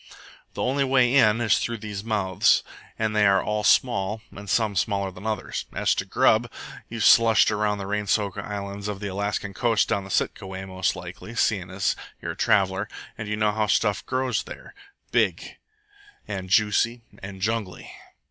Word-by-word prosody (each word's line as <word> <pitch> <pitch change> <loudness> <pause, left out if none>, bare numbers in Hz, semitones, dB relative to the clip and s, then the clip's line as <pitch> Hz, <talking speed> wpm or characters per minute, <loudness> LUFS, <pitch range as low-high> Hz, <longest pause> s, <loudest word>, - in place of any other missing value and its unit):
The - - -2
only 140 +2 +1
way 130 -2 +3
in 115 -5 +5
is 110 -4 +3
through 115 0 -2
these 105 -2 -6
mouths, 100 -5 +2 0.3
and 110 -1 -1
they 105 -1 +4
are 95 -1 +3
all 105 0 -1
small, 110 -3 +2
and 100 0 -10
some 110 -2 +1
smaller 100 0 0
than 90 +4 -8
others. 110 -1 -3
As - - +1
to - - -2
grub - - +3 0.4
you've 115 -2 -3
slushed 115 -2 +6
around 105 0 +1
on - - -4
the 100 - -5
rain 105 +1 -2
soaked 100 -1 0
islands 100 0 -5
of 105 -2 -4
the 100 -1 -4
Alaskan 100 0 -3
coast 115 0 +1
down 100 -1 -1
Sitka 95 - -1
way, 95 0 -6
most 95 -1 -1
likely, 115 - -9
seeing 95 -6 0
as 95 +1 0 0.2
you're - - -4
a - - -8
traveller. 95 +2 +1 0.3
And 110 - -6
you 105 - -1
know 105 -1 +2
how 105 0 0
stuff 105 0 +1
grows 130 -1 -1
there - - -11 0.4
big, - - 0 0.7
and 95 -3 -5
juicy, 115 +3 +2 0.2
and 95 0 -8
jungly. 105 -2 -3
105 Hz, 180 wpm, -25 LUFS, 100-110 Hz, 0.7 s, slushed